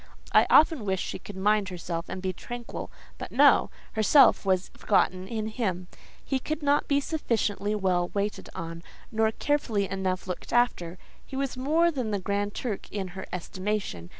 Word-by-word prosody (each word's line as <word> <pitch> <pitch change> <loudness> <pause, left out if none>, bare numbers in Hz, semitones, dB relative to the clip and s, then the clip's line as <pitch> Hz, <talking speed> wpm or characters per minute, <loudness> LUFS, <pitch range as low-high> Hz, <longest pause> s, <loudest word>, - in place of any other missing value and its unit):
I - - +6
often 310 -5 +5
wished 190 -2 -1
she - - -6
would 205 - -8
mind 205 0 +2
herself 170 -1 -5
and 185 0 -5
be 185 -1 -1
tranquil; 240 +5 -7 0.3
but - - -6
no—herself 240 +5 +4
was 185 -1 +1
forgotten 185 -2 +1
in 220 0 -3
him: 190 -6 -2 0.4
he 270 - 0
could 305 +3 -4
not 285 0 +2
be 280 -1 +3
sufficiently 220 -9 -1
well 185 -3 +1
waited 200 -1 -3
on, 165 0 -6 0.3
nor 220 0 +2
carefully 225 -7 0
enough 190 -1 -2
looked 180 -2 -6
after; 185 -8 +1 0.3
he 270 - -10
was 270 -1 -2
more 315 +7 +2
than 255 -7 -3
the 205 - 0
Grand 200 +1 -2
Turk 220 -6 -4
in 195 -3 -3
her 190 +1 -8
estimation. 185 - -3
205 Hz, 165 wpm, -27 LUFS, 185-245 Hz, 0.4 s, I